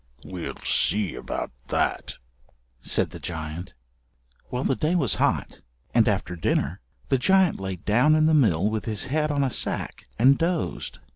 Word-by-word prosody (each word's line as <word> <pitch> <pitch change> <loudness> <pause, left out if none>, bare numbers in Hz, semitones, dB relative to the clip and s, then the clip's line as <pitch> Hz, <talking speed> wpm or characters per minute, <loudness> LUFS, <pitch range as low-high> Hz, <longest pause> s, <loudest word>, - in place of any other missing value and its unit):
"We'll 90 -2 -6
see 100 +1 +2
about 60 - -5 0.2
that," - - -1 0.7
said - - +1
the - - -9
giant. 80 +1 -6 0.7
Well, 125 +1 -2
the 135 - +1
day 155 +6 0
was 135 - +2
hot, - - 0 0.3
and - - +4
after 90 - 0
dinner 85 +1 -1 0.3
the 135 - +2
giant 190 +3 +3
lay 95 -1 -3
down 120 - +3
in 155 0 +3
the 160 - +4
mill 105 - +3
with 110 0 -2
his 110 +3 -1
head 155 0 +1
on 145 -1 +1
a 135 - 0
sack - - -2
and 130 +5 +5
dozed. 170 0 -2
125 Hz, 160 wpm, -25 LUFS, 90-155 Hz, 0.7 s, and